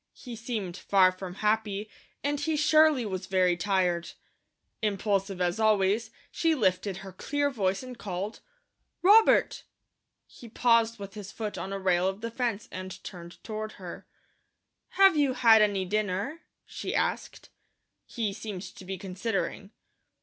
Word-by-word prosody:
He 245 -2 -9
seemed 220 -6 -4
far 190 -2 +4
from 185 -1 -8
happy, 210 -1 0 0.4
and 285 +1 0
he 310 +2 0
surely 305 -3 +4
was 190 -2 -4
very 185 -2 +3
tired. 175 -1 0 0.7
Impulsive 200 -2 -1
as 180 +3 0
always, 215 +1 +2 0.2
she 330 -1 +1
lifted 190 -5 0
her 190 0 -9
clear 290 0 -1
voice 195 -3 -1
and 255 -1 -8
called: 200 -1 -5 0.6
"Robert!" 425 +4 +5 0.6
He 235 - -14
paused 230 0 +3
with 200 -2 -8
his 200 -2 -8
foot 215 -2 -5
on 195 - -5
a 195 - -2
rail 185 -1 +2
of 195 +2 -3
the 230 0 -4
fence, 230 -3 -2
and 185 0 -7
turned 175 -1 -10
toward 215 0 -5
her. 180 -3 -9 0.9
"Have 390 -3 +7
you 285 -3 +2
had 225 -3 +6
any 200 -3 +2
dinner?" 210 - -2 0.2
she - - -5
asked. - - -2 0.6
He 220 -4 -2
seemed 200 -2 -6
to 190 0 -11
be 190 +1 -5
considering. 195 +1 -3
205 Hz, 145 wpm, -28 LUFS, 190-230 Hz, 0.9 s, Have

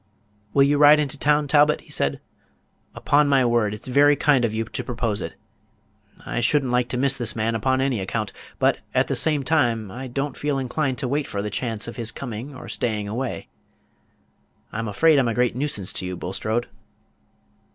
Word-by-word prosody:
"Will 140 - +6
you 145 +1 +2
ride 150 +1 +7
into 145 -2 0
the - - -7
town, 150 0 +3
Talbot?" 150 +1 +4
he - - -17
said. 70 - 0 0.8
"Upon 145 0 +2
my 135 -2 +4
word, 120 -3 +2
it's 105 +3 -5
very 145 +3 +5
kind 140 -3 +3
of 115 - +1
you 110 +1 -2
to - - -5
propose 115 -5 -2
it. - - -6 0.9
I - - -2
should 145 +5 +3
n't 125 - -3
like 125 -1 +1
to 125 - -2
miss 135 +1 +2
this 120 -4 -1
man 115 +1 0
upon 130 +4 +1
any 135 -4 0
account; 100 +1 -3 0.2
but, - - +2 0.2
at - - +3
the - - 0
same 150 -3 +2
time, 120 -8 +1
I 130 +4 -6
don't 135 +2 -3
feel 145 -1 -1
inclined 135 0 -1
to 135 - -2
wait 145 +3 -1
for 100 0 -4
the 105 - -4
chance 115 0 -2
of 120 - -8
his 115 -2 -2
coming 125 +2 -7
or - - -10
staying 105 -3 -2
away. 120 +5 -4 1.2
I'm 115 +1 -4
afraid 150 +8 +4
I'm 130 - +2
a 115 - -1
great 125 -1 +1
nuisance 125 -9 -3
to - - -4
you, 90 -1 -5
Bulstrode." 110 +7 -2
125 Hz, 205 wpm, -23 LUFS, 110-140 Hz, 1.2 s, ride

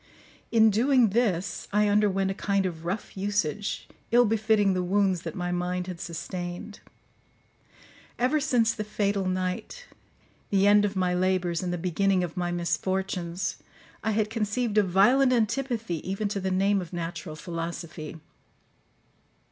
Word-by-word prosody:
In 220 -1 +5
doing 245 +2 +4
this, 200 -4 0
I 210 +1 +3
underwent 200 -2 +2
a - - -1
kind 200 0 0
of 165 -3 -4
rough 195 +5 -4
usage, 205 -1 -2 0.2
ill 240 +1 +6
befitting 215 -2 +2
the 185 - 0
wounds 190 -1 +1
that 165 -3 -6
my 180 -1 -2
mind 180 0 -1
had 180 -2 -7
sustained. 175 +4 -6 1.4
Ever 255 +5 +2
since 235 -5 +2
the 215 - -4
fatal 200 -2 -1
night, 185 - -3 0.6
the 195 -1 +3
end 205 0 +6
of 200 0 -2
my 180 -1 +1
labours, 180 -2 +1
and 180 -1 -2
the 175 - -1
beginning 185 +2 +1
of 170 -2 -5
my 175 -1 -1
misfortunes, 180 0 -2 0.5
I 220 - 0
had 215 0 0
conceived 215 0 0
a - - +6
violent 245 +9 +4
antipathy 230 -4 0
even 195 +2 -1
to 200 - -2
the 190 0 -2
name 195 +1 +2
of 175 - -9
natural 165 -2 -5
philosophy. 165 0 -6
195 Hz, 150 wpm, -27 LUFS, 180-210 Hz, 1.4 s, ill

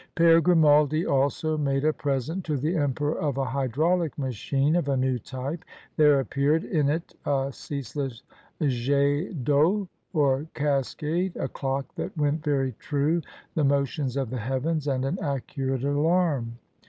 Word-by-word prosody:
Pere 165 0 +6
Grimaldi 155 -2 +4
also 145 +3 +1
made 140 -1 0
a 155 - +3
present 145 +7 -2
to 155 -3 -1
the 155 +7 -1
emperor 145 0 0
of 145 -4 -1
a 135 - 0
hydraulic 150 +6 0
machine 135 +3 0
of 170 -5 0
a 135 - +1
new 130 -1 +1
type. 135 - -5 0.3
There 150 -3 +5
appeared 140 +4 +1
in 150 -5 +1
it 160 +3 -2
a 135 -1 0
ceaseless 140 -3 -5 0.4
jet 140 +5 0
d'eau, 160 - +2 0.2
or 145 -2 +1
cascade, 150 +5 -1
a - - -1
clock 135 0 -3
that - - -5
went 150 +1 +1
very 135 -3 +1
true, 150 +4 0 0.3
the 155 - +1
motions 140 -1 0
of 130 -4 -2
the 130 - -3
heavens, 135 +6 -1
and 130 -2 0
an 155 +8 -2
accurate 135 -2 -2
alarm. 145 -4 +1
145 Hz, 150 wpm, -26 LUFS, 135-155 Hz, 0.4 s, Pere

